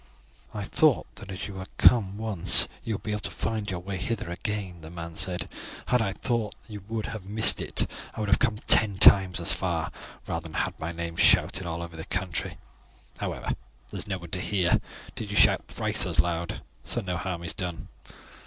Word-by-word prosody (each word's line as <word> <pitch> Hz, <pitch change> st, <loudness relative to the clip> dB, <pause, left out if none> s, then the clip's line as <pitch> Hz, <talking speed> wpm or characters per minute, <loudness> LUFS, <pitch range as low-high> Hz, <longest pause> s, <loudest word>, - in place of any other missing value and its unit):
"I 105 Hz, -, -5 dB
thought 150 Hz, +6 st, +3 dB
that 100 Hz, -4 st, -8 dB
as 95 Hz, 0 st, -5 dB
you 100 Hz, -2 st, -8 dB
had 95 Hz, 0 st, -7 dB
come 100 Hz, -5 st, +5 dB
once 110 Hz, -6 st, +5 dB, 0.2 s
you 110 Hz, -, -2 dB
would -, -, -8 dB
be 110 Hz, -, -3 dB
able 105 Hz, -, -1 dB
to -, -, -3 dB
find 110 Hz, -2 st, -3 dB
your 90 Hz, -2 st, -4 dB
way 95 Hz, +1 st, -5 dB
hither 95 Hz, -2 st, -3 dB
again," 95 Hz, -2 st, -4 dB
the 80 Hz, -, -10 dB
man 85 Hz, -1 st, -8 dB
said. 90 Hz, +1 st, -2 dB, 0.4 s
"Had 125 Hz, -1 st, +3 dB
I 100 Hz, -3 st, -1 dB
thought 115 Hz, -2 st, -2 dB
that 110 Hz, -, -13 dB
you 100 Hz, -2 st, -8 dB
would 110 Hz, -1 st, -2 dB
have 105 Hz, -4 st, -7 dB
missed 110 Hz, +1 st, +4 dB
it -, -, +1 dB, 0.3 s
I -, -, -7 dB
would 105 Hz, -2 st, -2 dB
have 100 Hz, -, +4 dB
come 115 Hz, -5 st, +1 dB
ten 100 Hz, -4 st, +5 dB
times 95 Hz, -2 st, +7 dB
as 85 Hz, +1 st, +3 dB
far, 85 Hz, -2 st, -2 dB, 0.3 s
rather 85 Hz, -, -3 dB
than 80 Hz, -, -9 dB
have -, -, 0 dB
had -, -, -29 dB
my 80 Hz, +1 st, -3 dB
name 85 Hz, 0 st, -5 dB
shouted 90 Hz, +1 st, +3 dB
all 85 Hz, 0 st, -4 dB
over 85 Hz, -1 st, -9 dB
the 80 Hz, -, -7 dB
country. 95 Hz, -3 st, -3 dB, 0.6 s
However, -, -, -3 dB, 0.4 s
there -, -, -5 dB
is -, -, -7 dB
no 95 Hz, -2 st, -2 dB
one 85 Hz, -2 st, -11 dB
to 90 Hz, -, -2 dB
hear, 90 Hz, -4 st, +1 dB, 0.3 s
did 105 Hz, -, -6 dB
you 105 Hz, -, -3 dB
shout -, -, +4 dB
thrice -, -, 0 dB
as -, -, -3 dB
loud, 85 Hz, 0 st, 0 dB, 0.2 s
so 120 Hz, -, -1 dB
no 90 Hz, -3 st, -3 dB
harm 85 Hz, -1 st, -4 dB
is 85 Hz, -, -5 dB
done." 90 Hz, -2 st, -5 dB
95 Hz, 220 wpm, -27 LUFS, 85-105 Hz, 0.6 s, times